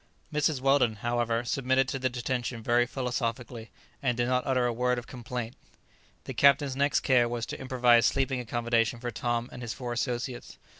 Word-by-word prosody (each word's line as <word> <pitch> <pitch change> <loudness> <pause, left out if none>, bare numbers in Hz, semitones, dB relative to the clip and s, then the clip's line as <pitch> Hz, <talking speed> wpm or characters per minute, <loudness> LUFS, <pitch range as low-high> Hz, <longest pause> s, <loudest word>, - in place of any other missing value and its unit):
Mrs. 150 -2 +1
Weldon, 135 -4 +3
however, 120 -1 0
submitted 130 +1 +1
to 135 - -3
the 130 0 0
detention 120 -1 -3
very 120 +1 +3
philosophically, 120 -2 -3 0.3
and 125 -3 0
did 120 0 +1
not 125 +1 0
utter 130 -2 +2
a 120 - 0
word 125 +1 +1
of 120 - -5
complaint. 120 -1 -6 0.7
The 130 - -6
captain's 140 +2 +4
next 140 +1 +2
care 125 -3 +3
was 120 -1 -3
to - - -7
improvise 120 -3 +4
sleeping 135 -1 0
accommodation 115 0 0
for 120 0 -4
Tom 120 +1 -2
and 125 - -9
his 120 -2 -5
four 125 -2 -4
associates. 120 0 -3
125 Hz, 180 wpm, -28 LUFS, 120-130 Hz, 0.7 s, captain's